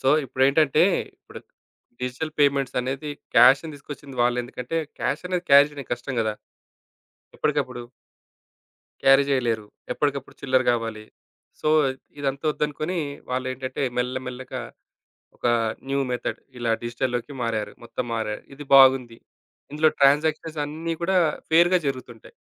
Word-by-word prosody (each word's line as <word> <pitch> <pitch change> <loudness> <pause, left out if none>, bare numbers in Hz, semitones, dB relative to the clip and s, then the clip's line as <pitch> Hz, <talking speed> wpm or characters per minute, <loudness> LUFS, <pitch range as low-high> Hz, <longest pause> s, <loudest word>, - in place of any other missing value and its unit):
So, 130 - +1 0.2
ఇప్పుడేంటంటే 140 +4 +3 0.3
ఇప్పుడు - - -12 0.6
digital 125 +5 -3
payments 140 -3 +2
అనేది 135 +4 -4 0.3
క్యాష్‌ని 135 +4 +6
తీసుకొచ్చింది 140 -1 -10
వాళ్ళు. 120 0 +2
ఎందుకంటే 125 +5 -5 0.2
క్యాష్ 150 +6 -1
అనేది 180 -1 -1
క్యాష్ 140 +1 +7 0.2
కష్టం 125 +2 -4
కదా! 110 -1 0 1.0
ఎప్పటికప్పుడు. 130 -5 -1 1.2
క్యారీ 135 +1 +6
జేయలేరు. 120 -6 0 0.3
ఎప్పటికప్పుడు 140 -2 -2
చిల్లర 130 -1 +2
కావాలి. 115 -2 -3 0.6
సో 155 - 0 0.5
ఇదంతా 140 +1 -3
వద్దనుకుని 155 +4 -2 0.3
వాళ్ళు 130 0 -1
ఏంటంటే 130 +2 -5
మెల్ల 125 +1 0
మెల్లగా 130 +1 -6 0.8
ఒక - - -3 0.4
న్యూ 140 0 0
మెథడ్ 125 -1 -3 0.2
ఇలా 120 -1 -1
డిజిటల్‌లోకి 120 +2 -3
మారారు. 110 -3 -2
మొత్తం 115 +1 -4
మారారు, 105 -2 -3
ఇది 145 - -9
బాగుంది. 130 -3 +6 0.5
ఇందులో 155 +1 +4
ట్రాన్సాక్షన్స్ 155 +3 +3
అన్నీ 160 +3 -4
కూడా 190 +2 +1 0.3
ఫెయిర్‌గా 175 +3 +5
జరుగుతుంటాయి. 125 -4 -6
135 Hz, 115 wpm, -24 LUFS, 125-150 Hz, 1.2 s, క్యాష్